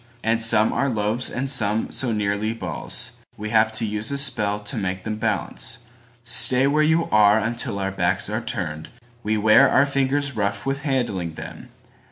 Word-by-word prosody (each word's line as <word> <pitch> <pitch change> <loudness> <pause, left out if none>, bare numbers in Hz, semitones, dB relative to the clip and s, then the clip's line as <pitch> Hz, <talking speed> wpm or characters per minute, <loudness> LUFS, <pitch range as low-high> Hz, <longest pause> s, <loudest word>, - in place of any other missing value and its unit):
And 115 +1 +1
some 110 -1 +4
are 140 - 0
loaves 110 +2 -1
and 135 +2 -3
some 110 -5 +1
so 125 -3 -1
nearly 105 +1 -1
ballsWe 110 -1 -6
have 110 0 +3
to 110 +1 -2
use 105 0 -3
a 140 - -2
spell 105 -7 0
to 105 +5 -5
make 95 -3 -3
them 110 0 -4
balance:"Stay 120 +3 0
where 145 +2 +2
you 160 +2 +2
are 105 0 +5
until 115 -2 -2
our 95 -1 -2
backs 95 0 0
are 110 +3 -3
turned!"We 110 +4 -5
wear 110 +1 +5
our 140 - +4
fingers 140 0 -1
rough 100 -1 -2
with 135 +1 -2
handling 110 - -2
them. - - -10
110 Hz, 165 wpm, -22 LUFS, 105-125 Hz, -, are